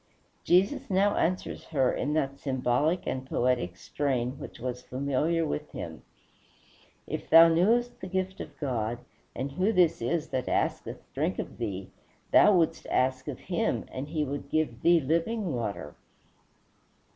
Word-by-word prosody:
Jesus 185 +3 +2
now 200 +2 +3
answers 185 +3 -1
her 135 -5 +1
in 145 +3 -1
that 140 -3 -1
symbolic 135 +5 0
and 130 - -2
poetic 120 -9 0
strain 130 -1 -2
which 140 - -9
was 125 0 -4
familiar 140 +6 0
with 150 0 -3
him: 80 -2 -7 1.0
"If - - -5
thou 165 +1 +9
knewest 230 +9 +2
the 185 - -5
gift 190 +1 -2
of 145 - -9
God, 120 -4 -1 0.4
and 135 +3 -3
who 185 +9 +1
this 180 - +3
is 155 +7 -1
that 130 -1 -2
asketh - - -1
drink - - -1
of - - -6
thee, 95 -1 -4 0.4
thou 210 - +7
wouldst 165 -2 0
ask 130 +1 +1
of 140 -4 -5
him, 220 +5 -1
and 130 +2 -5
he 155 0 -1
would 140 0 -5
give 145 -7 -1
thee 170 0 +5
living 170 - 0
water." 105 - -4
145 Hz, 150 wpm, -28 LUFS, 125-170 Hz, 1.0 s, thou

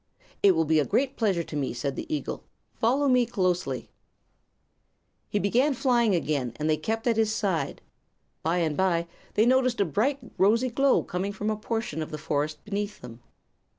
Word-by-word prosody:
"It 195 -3 +6
will 160 0 +2
be 155 0 +3
a - - +3
great 265 - 0
pleasure 195 -7 +1
to 155 - -8
me," 140 -4 -1
said 135 +2 -2
the - - -6
eagle. 305 - -3 0.4
"Follow 265 +5 +2
me 250 -2 +4
closely, 180 - 0
please." - - -26 1.4
He - - 0
began 250 +8 +2
flying 240 -6 +2
again, 145 -7 -1
and 150 - -2
they 155 - +3
kept 225 +9 -3
at 235 -2 +2
his 220 -1 +2
side. 190 -10 -1 0.6
By 165 +3 0
and 160 -4 0
by 170 -2 +1 0.3
they 215 - +4
noticed 255 0 +3
a 200 - +3
bright, 260 +9 +1 0.2
rosy 230 +6 +3
glow 270 +2 +3
coming 185 +3 -3
from 210 +1 -2
a - - 0
portion 225 -4 -3
of 155 - -4
the 155 - -5
forest 150 0 -2
beneath 205 0 -4
them. 120 -1 -11
200 Hz, 185 wpm, -27 LUFS, 155-235 Hz, 1.4 s, It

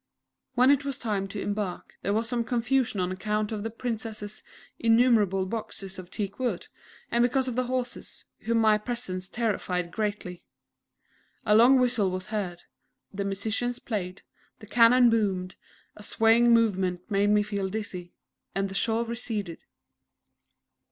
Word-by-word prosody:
When 255 +2 +6
it 285 0 +3
was 275 -2 -2
time 205 -4 -2
to 195 - -6
embark 205 -3 -4
there 200 - -1
was 220 +2 0
some 235 0 -1
confusion 240 -2 0
on 180 0 0
account 210 +3 -2
of 215 -2 -3
the 225 - -3
Princess's 220 -3 -5 0.4
innumerable 225 -5 +3
boxes 195 -2 -6
of 180 -1 -10
teak 200 +1 -4
wood, 255 -2 -2 0.4
and 235 - +2
because 260 +2 +2
of 250 - -3
the 255 0 0
horses, 250 0 -4
whom 230 0 0
my 215 -1 +4
presence 205 -5 -5
terrified 185 -6 -2
greatly. 205 -3 -3 1.0
A 210 - +4
long 240 +5 +7
whistle 240 -6 +2
was 185 +3 -5
heard; 180 -5 -3 0.5
the 200 +1 -2
musicians 220 +5 -2
played; 195 -6 -5 0.3
the 215 - -12
cannon 235 +2 +5
boomed; 190 -5 0 0.4
a - - -12
swaying 225 +3 +4
movement 190 -6 +2
made 200 +1 +3
me 210 0 +4
feel 200 -2 -3
dizzy 185 -4 -5 0.4
and 195 0 0
the - - -7
shore 225 +3 +1
receded. 220 -7 -4
215 Hz, 150 wpm, -27 LUFS, 195-235 Hz, 1.0 s, long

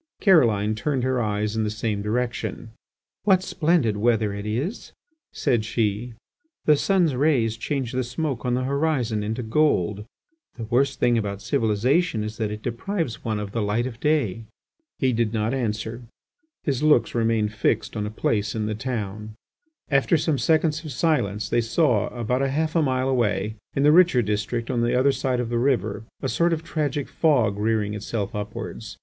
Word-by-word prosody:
Caroline 115 - +4
turned 130 +3 -1
her 130 -1 +1
eyes 105 0 -1
in 110 - 0
the 105 - 0
same 105 -1 -2
direction. 115 +1 -3 0.5
"What 190 -3 +4
splendid 155 - +1
weather 110 -1 +1
it 100 +1 -5
is!" 135 - -3 0.4
said 120 -6 0
she. 110 +1 -1 0.5
"The 150 - +6
sun's 175 -1 +2
rays 125 -5 +2
change 130 +1 -3
the 130 0 -1
smoke 130 +1 -3
on 125 -1 0
the 130 - -1
horizon 135 -5 0
into 110 +4 -3
gold. 105 - +1 0.5
The 115 - -5
worst 130 +4 +1
thing 120 -1 +3
about 100 -2 -3
civilization 115 - +1
is 110 +1 -5
that 110 -2 -1
it 105 0 -7
deprives 165 - -3
one 110 -2 -1
of 105 -1 -5
the 115 - -2
light 105 +4 0
of 120 -3 -6
day." 115 -9 0 0.5
He 130 -2 +1
did 115 -1 0
not 110 +3 0
answer; 115 -2 -3 0.6
his 135 -3 -1
looks 150 -5 +3
remained 115 -2 +1
fixed 105 +2 0
on 105 -1 -2
a - - -3
place 105 -1 -1
in 110 -1 -1
the 110 - -2
town. 110 -3 -4 0.6
After 140 +4 +3
some 150 -2 0
seconds 160 0 +2
of 155 - -6
silence 110 - 0
they 120 - +2
saw 115 - +2
about 125 +2 -2
half 155 +4 0
a 165 - +4
mile 130 -3 +1
away, 110 -5 0 0.2
in 140 - +1
the 150 - +6
richer 170 -7 +5
district 110 +3 -2
on 120 -2 0
the 120 +1 +2
other 135 +2 +4
side 130 -2 -1
of 120 -2 -2
the 120 0 0
river, 115 -5 0 0.2
a - - +1
sort 170 +5 +2
of 160 0 -3
tragic 150 -3 -2
fog 120 -11 +2
rearing 105 -1 0
itself 105 0 -3
upwards. 105 -1 -6
120 Hz, 180 wpm, -24 LUFS, 105-140 Hz, 0.6 s, The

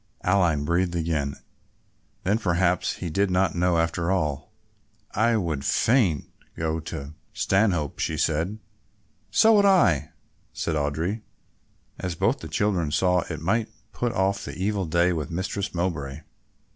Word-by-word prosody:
Aline 85 -6 +2
breathed 85 +2 +1
again. 80 -4 -1 0.9
Then 105 +4 +1
perhaps 90 -3 +1
he 85 - -5
did 100 +4 +1
not 90 -1 +2
know 90 -1 +2
after 85 +1 0
all. 75 -7 -1 0.6
"I 115 +2 +2
would 80 -8 -2
fain 90 - +2 0.3
go 80 0 -1
to 70 -2 -7 0.2
Stanhope," 95 -7 +1
she 80 - -1
said. 85 +6 0 0.7
"So 225 +1 +5
would 205 -2 +5
I," 85 - +4 0.4
said 80 - -2
Audry, 80 +9 -1 0.8
as 90 -2 -3
both - - +1
the - - -7
children 95 -7 0
saw 90 +3 +2
that - - -10
it 80 -1 -5
might 110 +7 0 0.2
put 120 -1 -1
off 100 +1 0
the - - -7
evil 100 0 -1
day 85 +2 +2
with 80 -1 -3
Mistress 95 +3 -3
Mowbray. 80 -5 -2
85 Hz, 145 wpm, -25 LUFS, 80-95 Hz, 0.9 s, So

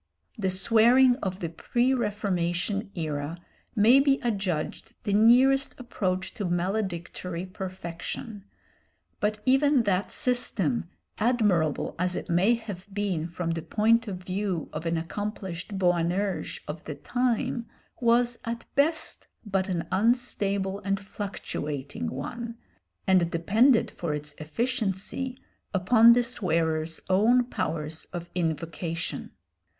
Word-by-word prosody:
The 200 -5 -1
swearing 230 +7 +5
of 190 -6 -4
the 170 - -2
pre 240 +10 +1
Reformation 200 -3 -1
era 155 -1 -3 0.4
may 230 +5 +6
be 275 0 +3
adjudged 200 -1 -2
the 205 - -1
nearest 255 +7 +5
approach 190 -6 -2
to 205 - -4
maledictory 180 -1 -2
perfection, 185 +3 -6 0.8
but 210 +1 0
even 270 0 +4
that 195 -2 0
system, 190 - 0 0.3
admirable 210 - +2
as 180 0 0
it - - -4
may 190 +8 +4
have 205 -4 -8
been 195 -5 -1
from 170 0 -3
the 165 0 -2
point 230 +5 +2
of 185 -2 -5
view 185 -3 -2
of 155 +2 -4
an 165 0 +1
accomplished 190 +1 -4
Boanerges 180 +2 0
of 150 +2 -6
the 150 - -5
time, 240 - -1 0.3
was 240 0 +3
at 230 0 -4
best 315 +3 0 0.2
but 195 -1 0
an 170 -3 -2
unstable 200 -2 +1
and 195 -1 -1
fluctuating 150 -8 -5
one, 230 - -5 0.5
and 185 -3 +4
depended 220 +8 +3
for 160 -4 -3
its 150 0 -7
efficiency 225 - -2 0.4
upon 225 +5 +7
the 245 +1 +3
swearer's 165 -8 0
own 220 +7 +4
powers 160 -8 -3
of 175 -1 -7
invocation. 165 0 -3
195 Hz, 120 wpm, -27 LUFS, 170-230 Hz, 0.8 s, upon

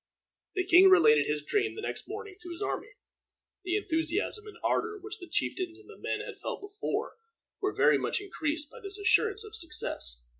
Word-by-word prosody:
The 375 - +1
king 370 +1 +8
related 150 - +6
his 150 -1 -1
dream 415 - 0
the 435 - -6
next - - -4
morning 410 -3 -7
to 355 - -8
his 345 +3 -4
army. - - -4 0.7
The 365 0 -1
enthusiasm 390 +3 0
and 420 - -11
ardor 435 -1 0
which 415 +2 -8
the 355 - -9
chieftains 345 +1 -2
and 415 - -18
the 430 - -12
men - - -3
had - - -8
felt - - -4
before 405 +3 -4 0.4
were 400 0 0
very - - +5
much - - 0
increased 315 -6 -2
by - - -11
this 395 0 -3
assurance 410 +2 +3
of 430 0 -10
success. 300 - 0
385 Hz, 190 wpm, -30 LUFS, 335-415 Hz, 0.7 s, king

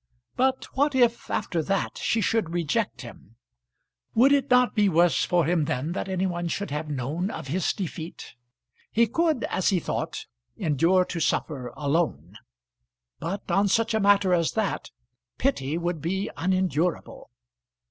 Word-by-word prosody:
But 260 +1 +1
what 285 +1 +2
if 240 -2 +2
after 175 -5 -1
that 195 +4 -2
she 225 - +1
should 220 -3 +1
reject 170 - -1
him? 115 -3 -12 0.8
Would 255 +5 +6
it 280 -1 +1
not 250 -1 +4
be 210 -3 +3
worse 170 0 +3
for 175 -3 +2
him 165 -1 +1
then 155 0 -2
that 195 +2 -3
any 190 0 0
one 175 -2 -2
should 200 +2 -3
have 150 +1 -3
known 150 +7 -2
of 135 - -7
his 180 +5 +1
defeat? 170 -4 -6 0.6
He 235 +1 +4
could, 310 +2 0
as 190 - 0
he 190 -3 +2
thought, 165 0 -4 0.3
endure 170 +3 +2
to 175 - -5
suffer 135 -5 -1
alone; 150 +3 -1 0.8
but 190 +2 -4
on 195 +3 +3
such 225 +4 +1
a 220 - +2
matter 200 -2 +4
as 170 -2 +1
that 220 - -2 0.5
pity 160 - 0
would 170 -2 -2
be 190 +5 -2
unendurable. 180 -2 -1
180 Hz, 155 wpm, -26 LUFS, 160-215 Hz, 0.8 s, Would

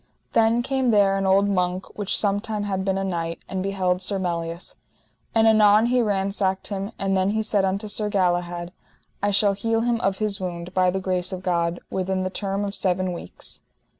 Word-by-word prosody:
Then 230 +1 +3
came 265 -1 0
there 200 -3 +4
an 195 0 0
old 195 +1 +4
monk 185 -1 0
which 205 -2 0
sometime 205 +1 0
had 190 -2 -2
been 190 0 0
a 195 - -1
knight, 170 -3 -2
and 190 -1 -3
beheld 185 -2 0
Sir 195 +1 0
Melias. 170 -2 -3 0.6
And 225 0 +5
anon 215 0 +6
he 250 +1 +3
ransacked 195 -2 0
him; 200 +1 -3
and 195 0 0
then 190 +1 +2
he 220 +1 0
said 205 -2 +1
unto 195 +3 -1
Sir 210 0 -2
Galahad: 175 -3 0 0.5
I 205 - +2
shall 205 0 +4
heal 225 +3 0
him 235 0 0
of 195 0 +1
his 210 -2 -2
wound, 175 -1 -5
by 185 -1 +3
the 190 +1 -1
grace 185 -1 -1
of 185 -1 -5
God, 170 -1 0
within 185 0 -1
the 185 - -2
term 195 0 -2
of 200 - -4
seven 185 -2 0
weeks. 170 - -7
195 Hz, 195 wpm, -24 LUFS, 185-205 Hz, 0.6 s, anon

